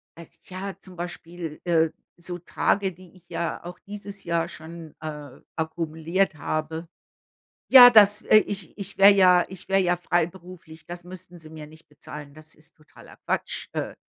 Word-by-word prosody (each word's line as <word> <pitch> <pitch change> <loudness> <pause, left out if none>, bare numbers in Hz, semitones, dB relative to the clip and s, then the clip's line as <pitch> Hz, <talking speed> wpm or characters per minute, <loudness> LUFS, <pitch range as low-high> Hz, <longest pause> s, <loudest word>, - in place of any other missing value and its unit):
äh, 170 0 -12 0.2
ja, 190 +1 -7
zum 185 -1 -11
Beispiel, 175 -2 -7
äh, 165 -2 +2 0.3
so 175 +1 -4
Tage, 190 +3 0
die 180 0 -17
ich 175 -1 -22
ja 170 - -4
auch 180 +1 -9
dieses 200 -1 -8
Jahr 170 -1 -1
schon, 160 -1 -10
äh, 150 -4 -8 0.2
akkumuliert 160 +3 -1
habe. 155 +2 -4 0.8
Ja, 250 -2 +11
das, 210 -2 +6
äh, 215 - +5
ich 200 -4 -2
ich 200 -1 -8
wäre 195 +1 +9
ja 185 -3 +5
ich 190 -1 -11
wäre 195 0 +3
ja 175 -1 +1
freiberuflich. 175 -2 -4
Das 175 0 -8
müssten 180 -1 -12
sie 160 -1 -13
mir 155 -1 -10
nicht 155 +1 -18
bezahlen. 150 0 -11
Das 155 +1 -12
ist 155 +1 -17
totaler 155 - -18
Quatsch. - - -2
Äh - - -4
175 Hz, 165 wpm, -25 LUFS, 160-185 Hz, 0.8 s, Ja